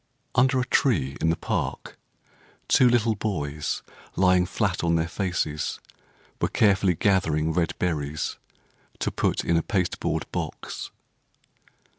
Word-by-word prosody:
Under 130 Hz, +1 st, +4 dB
a 125 Hz, -, 0 dB
tree 80 Hz, -, +1 dB
in 80 Hz, -, +2 dB
the 80 Hz, -, +2 dB
park, -, -, -3 dB, 0.7 s
Two 125 Hz, -, +5 dB
little 115 Hz, -2 st, +3 dB
boys, 75 Hz, -9 st, -3 dB, 0.3 s
lying 90 Hz, -1 st, +4 dB
flat 95 Hz, -2 st, -1 dB
on 85 Hz, -1 st, +2 dB
their 80 Hz, 0 st, +1 dB
faces, 85 Hz, -4 st, -2 dB, 0.6 s
Were -, -, +3 dB
carefully 95 Hz, -4 st, +3 dB
gathering 80 Hz, -5 st, +1 dB
red 85 Hz, -1 st, 0 dB
berries 75 Hz, -4 st, -2 dB, 0.6 s
To -, -, -1 dB
put -, -, 0 dB
in 85 Hz, -, +3 dB
a -, -, +3 dB
pasteboard 95 Hz, -1 st, -1 dB
box. -, -, -5 dB
90 Hz, 125 wpm, -25 LUFS, 80-105 Hz, 0.7 s, Two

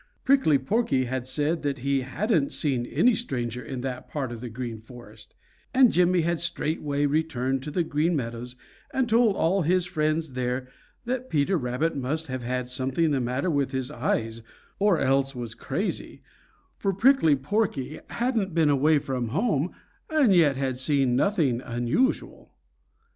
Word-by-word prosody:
Prickly 265 Hz, -, +4 dB
Porky 135 Hz, -, 0 dB
had 130 Hz, 0 st, -3 dB
said 150 Hz, +5 st, -1 dB
that 145 Hz, -1 st, -1 dB
he 140 Hz, -1 st, +2 dB
hadn't 155 Hz, -, 0 dB
seen 130 Hz, -5 st, -1 dB
any 245 Hz, +1 st, +3 dB
stranger 125 Hz, -, -3 dB
in 125 Hz, +2 st, -5 dB
that 130 Hz, -1 st, -5 dB
part 135 Hz, -5 st, -3 dB
of 115 Hz, -1 st, -7 dB
the 125 Hz, -, -5 dB
Green 115 Hz, -1 st, -6 dB
Forest, 110 Hz, -2 st, -14 dB, 0.4 s
and 260 Hz, -2 st, +6 dB
Jimmy 180 Hz, 0 st, +3 dB
had 170 Hz, 0 st, 0 dB
straightway 150 Hz, -3 st, -1 dB
returned 140 Hz, -3 st, 0 dB
to 145 Hz, -, -6 dB
the 170 Hz, +4 st, 0 dB
Green 160 Hz, +2 st, 0 dB
Meadows 120 Hz, -1 st, -4 dB, 0.4 s
and 265 Hz, -2 st, 0 dB
told 225 Hz, -2 st, +4 dB
all 190 Hz, +4 st, +2 dB
his 180 Hz, +2 st, +2 dB
friends 155 Hz, -3 st, -1 dB
there 125 Hz, 0 st, -2 dB, 0.4 s
that 255 Hz, +1 st, -3 dB
Peter 155 Hz, +4 st, +1 dB
Rabbit 130 Hz, +3 st, -1 dB
must 145 Hz, +4 st, -2 dB
have 130 Hz, -1 st, -3 dB
had 125 Hz, +1 st, -2 dB
something 130 Hz, +5 st, 0 dB
the 135 Hz, -2 st, +1 dB
matter 130 Hz, +8 st, -1 dB
with 140 Hz, -2 st, 0 dB
his 130 Hz, +1 st, -2 dB
eyes 115 Hz, -5 st, -2 dB, 0.4 s
or 200 Hz, -3 st, +4 dB
else 135 Hz, 0 st, +1 dB
was 120 Hz, -3 st, -4 dB
crazy, 120 Hz, -, -4 dB, 0.6 s
for 195 Hz, -, 0 dB
Prickly 200 Hz, -, +4 dB
Porky 145 Hz, -, -2 dB
hadn't 230 Hz, -7 st, -1 dB
been 160 Hz, -3 st, +4 dB
away 150 Hz, +3 st, +4 dB
from 130 Hz, -4 st, -2 dB
home 160 Hz, -, 0 dB, 0.4 s
and 295 Hz, -10 st, +4 dB
yet 155 Hz, -6 st, +4 dB
had 130 Hz, -2 st, -2 dB
seen 135 Hz, -2 st, +1 dB
nothing 145 Hz, -, +1 dB
unusual. 120 Hz, -, -1 dB
140 Hz, 160 wpm, -26 LUFS, 125-175 Hz, 0.6 s, and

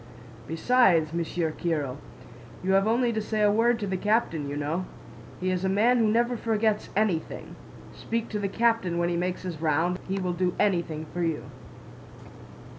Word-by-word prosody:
"Besides, 165 Hz, -3 st, +3 dB
Monsieur 170 Hz, -1 st, -1 dB
Kiril, 150 Hz, -6 st, -2 dB, 0.7 s
you 190 Hz, -, +1 dB
have 195 Hz, +2 st, +4 dB
only 235 Hz, +1 st, +2 dB
to 220 Hz, -, -1 dB
say 215 Hz, 0 st, -1 dB
a 205 Hz, -, +5 dB
word 230 Hz, +3 st, +3 dB
to 210 Hz, -, -2 dB
the 190 Hz, -1 st, -2 dB
captain, 180 Hz, -8 st, 0 dB
you 145 Hz, -, -4 dB
know. 155 Hz, +5 st, -2 dB, 0.5 s
He 185 Hz, 0 st, 0 dB
is 185 Hz, 0 st, -1 dB
a 190 Hz, -, +1 dB
man 230 Hz, +6 st, +3 dB
who 225 Hz, -, +3 dB
never 235 Hz, +3 st, +2 dB
forgets 220 Hz, -2 st, 0 dB
anything. 200 Hz, -6 st, -1 dB, 0.4 s
Speak 230 Hz, 0 st, -3 dB
to 210 Hz, -, -3 dB
the 200 Hz, -, -1 dB
captain 225 Hz, -6 st, +1 dB
when 170 Hz, 0 st, +1 dB
he 175 Hz, -, -1 dB
makes 180 Hz, +1 st, -2 dB
his 170 Hz, -4 st, -5 dB
round, 165 Hz, +3 st, +1 dB
he 190 Hz, +1 st, -2 dB
will 180 Hz, -1 st, -1 dB
do 180 Hz, 0 st, 0 dB
anything 170 Hz, -6 st, 0 dB
for 175 Hz, -, -2 dB
you." 165 Hz, -3 st, -1 dB
185 Hz, 180 wpm, -27 LUFS, 170-220 Hz, 0.7 s, a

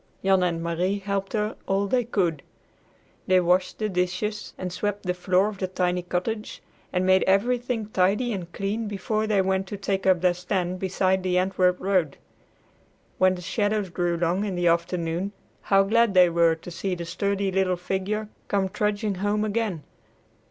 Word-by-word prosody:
Jan 190 Hz, -1 st, +4 dB
and 170 Hz, -2 st, 0 dB
Marie 175 Hz, +4 st, 0 dB
helped 200 Hz, -1 st, -3 dB
her 215 Hz, 0 st, -1 dB
all 195 Hz, +1 st, +1 dB
they 245 Hz, +5 st, +1 dB
could. 175 Hz, -10 st, 0 dB, 0.9 s
They 185 Hz, 0 st, +5 dB
washed 180 Hz, +1 st, +1 dB
the 215 Hz, -, -1 dB
dishes 185 Hz, +3 st, -2 dB
and 180 Hz, -1 st, -5 dB
swept 205 Hz, +1 st, -2 dB
the 180 Hz, -, +1 dB
floor 185 Hz, +2 st, +2 dB
of 210 Hz, -3 st, -6 dB
the 185 Hz, -, -1 dB
tiny 180 Hz, -1 st, 0 dB
cottage 185 Hz, +5 st, -4 dB, 0.3 s
and 185 Hz, 0 st, 0 dB
made 190 Hz, 0 st, +5 dB
everything 235 Hz, +3 st, +1 dB
tidy 210 Hz, +5 st, +1 dB
and 175 Hz, -3 st, -6 dB
clean 210 Hz, +4 st, -2 dB
before 215 Hz, +2 st, -2 dB
they 205 Hz, -3 st, +2 dB
went 190 Hz, 0 st, 0 dB
to 205 Hz, -, -5 dB
take 195 Hz, -1 st, -2 dB
up 185 Hz, -2 st, +4 dB
their 180 Hz, -1 st, +3 dB
stand 180 Hz, 0 st, -2 dB
beside 190 Hz, 0 st, +1 dB
the 180 Hz, -1 st, 0 dB
Antwerp 185 Hz, -1 st, +2 dB
road. 185 Hz, -7 st, 0 dB, 1.0 s
When 185 Hz, 0 st, +4 dB
the 180 Hz, -, -8 dB
shadows 205 Hz, 0 st, -1 dB
grew 175 Hz, -1 st, 0 dB
long 175 Hz, +3 st, 0 dB
in 200 Hz, -3 st, -2 dB
the 175 Hz, 0 st, -1 dB
afternoon, 170 Hz, +2 st, 0 dB, 0.3 s
how 195 Hz, 0 st, +4 dB
glad 220 Hz, 0 st, +2 dB
they 180 Hz, -2 st, +6 dB
were 165 Hz, -1 st, +4 dB
to 165 Hz, +2 st, -10 dB
see 185 Hz, +2 st, -2 dB
the 170 Hz, -1 st, -6 dB
sturdy 200 Hz, +3 st, -1 dB
little 185 Hz, -1 st, +1 dB
figure 195 Hz, +4 st, -2 dB, 0.2 s
come 195 Hz, -2 st, 0 dB
trudging 210 Hz, +1 st, -1 dB
home 210 Hz, +1 st, +1 dB
again! 210 Hz, -7 st, -2 dB
190 Hz, 175 wpm, -25 LUFS, 180-205 Hz, 1.0 s, they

